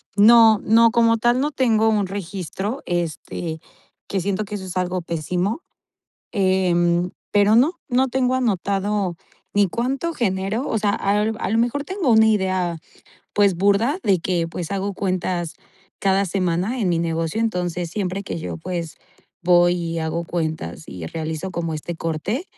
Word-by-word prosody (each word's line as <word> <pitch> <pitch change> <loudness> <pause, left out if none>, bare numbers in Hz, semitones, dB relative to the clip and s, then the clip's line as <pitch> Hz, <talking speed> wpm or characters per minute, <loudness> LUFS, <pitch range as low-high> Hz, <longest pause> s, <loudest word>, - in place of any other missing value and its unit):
No, 220 0 +7
no, 230 +1 +5
como 230 -1 +4
tal, 240 +2 +2
no 295 +2 0
tengo 225 -5 +2
un 210 -3 +1
registro, 195 - -4
este, 170 -1 -3 0.5
que 195 - -1
siento 200 +3 -1
que 210 - -6
eso 190 -2 -6
es 185 0 -5
algo 180 0 -1
pésimo. 180 - -2 0.7
Em, 180 -3 +2 0.2
pero, 205 +1 +5
no, 275 +8 +4 0.2
no 260 +1 +2
tengo 255 0 +1
anotado 200 -4 0 0.4
ni 205 0 +4
cuánto 265 - -2
genero 200 +1 -1
o - - 0
sea, 205 -1 +1
al 210 +3 +1
a - - -1
lo 225 - +2
mejor 245 +5 0
tengo 375 -8 -1
una 220 0 +6
idea, 185 -5 +1 0.5
pues, 200 -2 +3
burda 200 - +2
de 195 -2 +3
que, 170 0 -1
pues, 165 0 -5
hago 200 0 -2
cuentas 185 -3 -2 0.4
cada 195 0 +2
semana 185 +6 -1
en 200 - +1
mi 170 - +1
negocio. 165 +4 -1
Entonces 180 -5 -1
siempre 195 0 -3
que 195 - -5
yo, 160 - -5
pues, 170 -1 -5 0.5
voy 175 0 +5
y 165 -1 -3
hago 160 +1 -2
cuentas, 160 -1 -3
y 85 -3 -7
realizo 160 - -4
como 170 -2 -3
este 155 +3 -5
corte, 165 - -3
190 Hz, 160 wpm, -22 LUFS, 175-220 Hz, 0.7 s, No